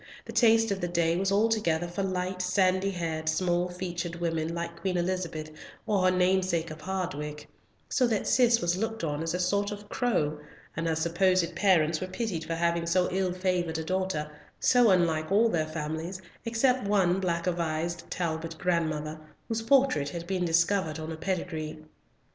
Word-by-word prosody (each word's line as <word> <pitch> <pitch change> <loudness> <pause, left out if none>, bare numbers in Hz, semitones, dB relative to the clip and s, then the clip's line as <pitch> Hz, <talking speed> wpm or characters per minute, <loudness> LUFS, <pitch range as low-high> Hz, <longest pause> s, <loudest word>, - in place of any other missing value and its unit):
The - - -8
taste 225 -2 +4
of 195 -1 -2
the 175 - 0
day 170 -1 +1
was 190 +2 0
altogether 200 -6 +2
for 175 +3 -4
light, 185 -1 -2
sandy 185 +1 +2
haired, 160 -4 -2
small 175 +2 +1
featured 175 -1 -4
women, 165 -1 -2
like 170 0 -5
Queen 185 -2 0
Elizabeth 175 -3 -2 0.3
or 205 -3 +1
her 185 - +4
namesake 180 -2 +1
of 155 0 -9
Hardwicke, 150 -6 -4 0.4
so 255 - +2
that 220 -4 0
Cis 240 -2 +4
was 175 0 +1
looked 225 +1 -3
on 150 -1 -2
as 165 +1 -2
a - - -2
sort 200 +3 +1
of 205 0 -8
crow, 155 -11 0 0.4
and 165 +1 -2
her 160 - +1
supposed 170 +2 +1
parents 165 -5 +3
were 185 - -2
pitied 185 -4 -3
for 165 - -2
having 170 0 0
so 180 +1 +2
ill 185 0 0
favoured 180 -3 -1
a 160 - -3
daughter, 185 -3 -1 0.3
so 245 -3 +5
unlike 165 -3 +2
all 220 +4 +5
their 160 -6 0
families, 160 +4 -4 0.3
except 240 0 +1
one 190 -3 +3
black 170 -3 -1
a 180 - +2
vised 170 0 -3
Talbot 165 -1 -3
grandmother, 155 -3 -1 0.3
whose 225 0 -2
portrait 235 - +3
had 170 +2 -6
been 185 -1 -1
discovered 170 -1 +2
on 160 0 -5
a - - -4
pedigree. 165 -2 -3
175 Hz, 175 wpm, -28 LUFS, 165-190 Hz, 0.4 s, so